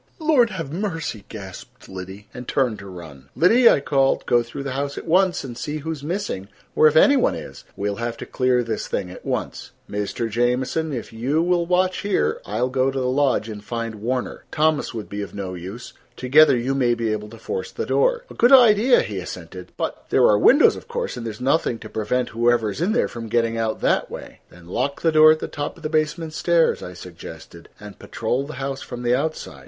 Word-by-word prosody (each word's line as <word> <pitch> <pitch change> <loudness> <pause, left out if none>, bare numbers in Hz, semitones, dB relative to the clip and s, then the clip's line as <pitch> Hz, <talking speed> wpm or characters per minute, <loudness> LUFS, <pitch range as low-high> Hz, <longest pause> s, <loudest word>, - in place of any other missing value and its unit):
"Lord 305 -8 +3
have 165 -8 -6
mercy!" 165 - -4
gasped 95 -4 -10
Liddy, 95 +2 -9
and 125 0 -8
turned 125 -5 0
to 100 - -10
run. 80 -7 -11
"Liddy," 230 - +6
I - - +3
called, 135 -1 +1
"go 120 - +3
through 120 +4 -7
the 140 - -4
house 140 +2 -3
at - - -6
once 185 +2 +2
and 125 -3 -7
see 150 +4 -4
who 155 +2 -4
is 150 -3 -6
missing, 170 - -3 0.3
or 155 - +6
if 155 - +2
any 280 - +6
one 260 - +2
is. - - -9
We'll 100 0 -2
have 115 0 -3
to - - -7
clear 125 -1 +1
this 115 -2 -3
thing 90 - -3
at - - -11
once. - - -4
Mr. 105 +3 -3
Jamieson, 125 +7 0
if 120 -4 -6
you 135 +8 0
will 175 -1 +1
watch 185 +1 +1
here 80 - 0
I 105 +3 -3
will 125 - +1
go 130 +1 +1
to 135 0 -3
the 130 - -1
lodge 130 -3 +1
and 105 -2 -8
find 115 -2 -5
Warner. 125 +3 -3
Thomas 155 -1 +1
would 110 -3 -6
be 100 0 -5
of 100 -4 -7
no 95 -2 -5
use. 95 +7 -8 0.2
Together 135 +1 +5
you 125 +3 -1
may 125 -3 +2
be 115 -2 -1
able 105 0 -4
to 115 - -12
force 460 - -4
the - - -4
door." - - +1
"A - - -12
good 240 +2 +3
idea," 240 -1 +6
he 100 -3 -4
assented. 90 0 -8
"But—there - - 0
are 105 - +5
windows, 280 - +6
of - - -11
course, 475 0 -3
and 115 - -6
there - - -3
is 105 - -12
nothing 130 -1 +1
to - - -10
prevent 120 +4 -1
whoever 115 -1 +1
is 125 - -6
in 195 +5 +1
there 240 - +2
from 115 -1 -7
getting 115 0 +1
out 115 -1 -2
that - - +1
way." - - -9
"Then 90 -1 -16
lock 140 +10 -2
the 165 - +4
door 155 0 +7
at 155 - +3
the - - -5
top 145 -1 -5
of - - -16
the 155 - -2
basement 155 +1 -1
stairs," 170 0 +2
I 90 - -7
suggested, 85 -2 -11
"and 105 -1 -11
patrol 125 +5 -2
the 155 - -7
house 135 +1 -4
from 125 0 -7
the 120 0 +2
outside." 135 - -3
125 Hz, 225 wpm, -22 LUFS, 110-160 Hz, 0.3 s, door